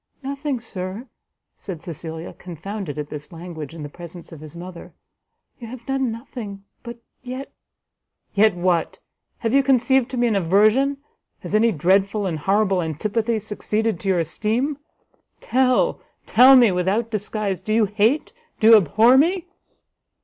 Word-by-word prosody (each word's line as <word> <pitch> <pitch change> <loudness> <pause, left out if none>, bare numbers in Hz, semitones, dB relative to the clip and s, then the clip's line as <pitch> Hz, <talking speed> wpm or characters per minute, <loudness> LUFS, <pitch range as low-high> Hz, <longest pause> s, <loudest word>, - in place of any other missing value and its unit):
"Nothing, 280 -1 -3
Sir," 195 0 -6 0.5
said 175 -5 -8
Cecilia, 160 0 -7
confounded 180 -1 -7
at 150 0 -5
this 150 +3 -8
language 165 -3 -8
in 160 - -7
the - - -5
presence 170 +2 -11
of 165 - -10
his 155 +1 -11
mother, 175 0 -10 0.6
"you 235 - -8
have 235 0 -10
done 270 -3 -1
nothing, 220 -4 -8 0.2
but 235 0 -8 0.2
yet 255 +2 -7 0.4
" - - -53
"Yet 210 -1 +4
what? 175 -2 0 0.5
have 225 - +1
you 275 - +5
conceived 265 -1 +2
to 255 - -5
me 240 - +2
an 225 -3 +1
aversion? 215 +10 +3 0.4
has - - -7
any 225 +2 +4
dreadful 195 +5 +1
and 165 -4 -2
horrible 195 +2 +1
antipathy 215 +8 -1
succeeded 215 +1 -2
to 215 - -7
your 185 - +2
esteem? 225 - -1 0.6
tell, 260 - +1 0.2
tell 255 +4 +7
me 240 -5 +6
without 195 +6 0
disguise, 210 -2 -2
do 215 - -5
you 220 0 +4
hate, 220 - +1 0.3
do 220 - +5
you 225 - +10
abhor 220 - +4
me?" 350 +4 +1
215 Hz, 155 wpm, -22 LUFS, 180-240 Hz, 0.6 s, you